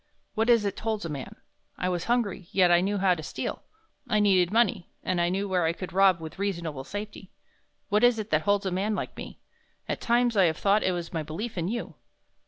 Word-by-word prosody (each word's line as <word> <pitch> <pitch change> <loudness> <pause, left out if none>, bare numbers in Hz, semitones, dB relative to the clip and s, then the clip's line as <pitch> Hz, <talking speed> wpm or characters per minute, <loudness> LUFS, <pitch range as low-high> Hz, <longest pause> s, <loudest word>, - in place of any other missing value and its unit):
What 225 +2 0
is 230 -3 +5
it 200 - -2
holds 220 -4 -2
a - - -3
man? 140 -3 -6 0.4
I 180 - -1
was 180 -1 -2
hungry, 215 -7 -1
yet 180 -2 +4
I 175 0 +5
knew 200 +2 0
how 190 -1 +3
to 165 - -5
steal; - - -5 0.5
I 215 -3 +3
needed 190 -3 +3
money, 230 -4 +1
and 180 -2 0
I 170 - +2
knew 195 +3 -1
where 185 -2 +1
I 160 - +1
could 180 -1 -7
rob 190 -2 +5
with 160 +3 -9
reasonable 170 -8 -3
safety. 205 +2 -7 0.6
What 210 +2 +2
is 245 -1 +5
it 215 -4 -5
holds 200 +6 +2
a 190 - -1
man 200 +4 0
like - - -4
me? - - -8 0.5
At - - -3
times 240 0 +2
I 195 -3 +5
have 160 -2 +1
thought 205 +1 +3
it 185 - +1
was 175 -1 -5
my 165 - -1
belief 165 +10 -5
in 170 -2 -2
you." 235 +4 -4
195 Hz, 225 wpm, -27 LUFS, 175-210 Hz, 0.6 s, is